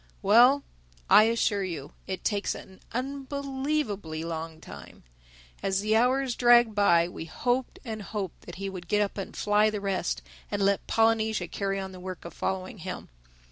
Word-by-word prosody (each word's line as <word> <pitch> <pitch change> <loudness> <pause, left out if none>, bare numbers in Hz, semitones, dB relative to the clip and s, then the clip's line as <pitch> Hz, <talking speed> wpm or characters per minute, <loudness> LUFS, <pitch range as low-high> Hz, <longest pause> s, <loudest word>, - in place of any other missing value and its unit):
Well, 245 +8 +6 0.5
I 215 - +9
assure 225 -3 +1
you 160 -7 -5
it 190 -1 -4
takes 205 -2 0
an 190 - -12
unbelievably 270 - -3
long 165 -1 -5
time. 70 - -12 0.6
As 195 0 0
the 215 +1 +2
hours 255 +2 +3
dragged 240 -2 +6
by, 170 -5 +4
we 175 - -7
hoped 245 +9 -1
and 220 -2 -5
hoped 200 -3 -5
that 175 - -8
he 195 +1 -4
would 185 -2 -7
get 210 +3 +3
up 200 0 -4
and 195 - -6
fly 210 +1 +3
the 210 -1 -3
rest, 195 -3 -2 0.3
and 205 -1 -1
let 200 0 +1
Polynesia 220 -4 +2
carry 195 +2 -2
on 190 0 -5
the 185 - -10
work 185 -1 -7
of 170 - -8
following 190 +1 -3
him. 180 +1 -6
205 Hz, 170 wpm, -28 LUFS, 185-230 Hz, 0.6 s, I